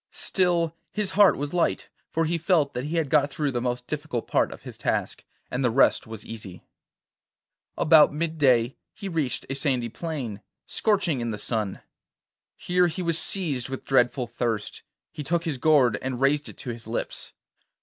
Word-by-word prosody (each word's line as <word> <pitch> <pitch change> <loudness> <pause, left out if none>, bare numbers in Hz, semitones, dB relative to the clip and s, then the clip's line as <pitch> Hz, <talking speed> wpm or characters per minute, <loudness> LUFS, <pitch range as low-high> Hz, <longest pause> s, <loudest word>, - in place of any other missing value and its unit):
Still 170 -3 +1 0.2
his 210 -3 -2
heart 200 0 +5
was 145 +2 -4
light, 175 -1 +1 0.2
for 165 0 0
he 170 +1 -1
felt 160 -4 +2
that 125 - -3
he 155 +3 -3
had 165 -3 +1
got 145 0 +3
through 145 -1 -1
the 120 -2 -2
most 125 0 -2
difficult 150 -5 -3
part - - +2
of - - -11
his - - -8
task, - - -2 0.3
and 125 +2 -1
the 125 - +3
rest 125 0 +3
was 110 -1 -8
easy. 105 -5 -8 1.1
About 155 -1 +6
mid 160 +2 -3
day 125 -3 +3 0.2
he 200 - -6
reached 160 -8 -2
a - - -3
sandy 130 -4 0
plain, 130 - -5 0.2
scorching 190 - +1
in 120 - -2
the 105 - -3
sun. 105 -3 -2 0.7
Here 180 0 +2
he 175 +2 -4
was 170 -1 +3
seized 145 -11 -1
with 135 - -6
dreadful 125 -1 +2
thirst; 115 -2 -3 0.3
he 150 - -6
took 170 +3 0
his 150 -6 -2
gourd 140 -5 +4
and 130 -2 -3
raised 145 +2 +2
it - - -12
to 125 - -5
his 115 -1 -8
lips. 115 - -4
145 Hz, 180 wpm, -26 LUFS, 120-165 Hz, 1.1 s, About